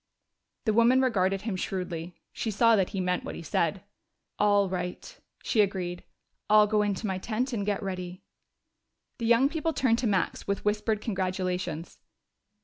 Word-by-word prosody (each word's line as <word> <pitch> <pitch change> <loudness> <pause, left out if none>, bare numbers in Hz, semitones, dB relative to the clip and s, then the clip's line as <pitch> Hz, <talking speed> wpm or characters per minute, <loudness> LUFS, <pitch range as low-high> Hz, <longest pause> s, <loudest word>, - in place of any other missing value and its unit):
The 220 - +2
woman 235 +3 +5
regarded 195 -7 +1
him 215 -4 -2
shrewdly; 180 -2 -4 0.2
she 225 - -3
saw 230 +2 +4
that 190 -3 +1
he 195 - -4
meant 180 0 0
what - - -6
he - - -7
said. 165 +3 0 0.6
"All 205 -1 +4
right," 180 -1 -5 0.3
she 220 - +3
agreed. 185 -3 -2 0.5
"I'll 210 0 +7
go 210 0 +2
into 205 +1 -1
my 190 -2 -1
tent 240 +6 -2
and 205 -3 -2
get 205 -1 -1
ready." 180 -1 -5 1.0
The 230 - -1
young 235 +3 +5
people 320 +2 -2
turned 240 -5 +2
to 245 - 0
Max 195 -3 -1
with 200 0 -2
whispered 210 +1 0
congratulations. 185 -5 -3
200 Hz, 160 wpm, -28 LUFS, 185-225 Hz, 1.0 s, I'll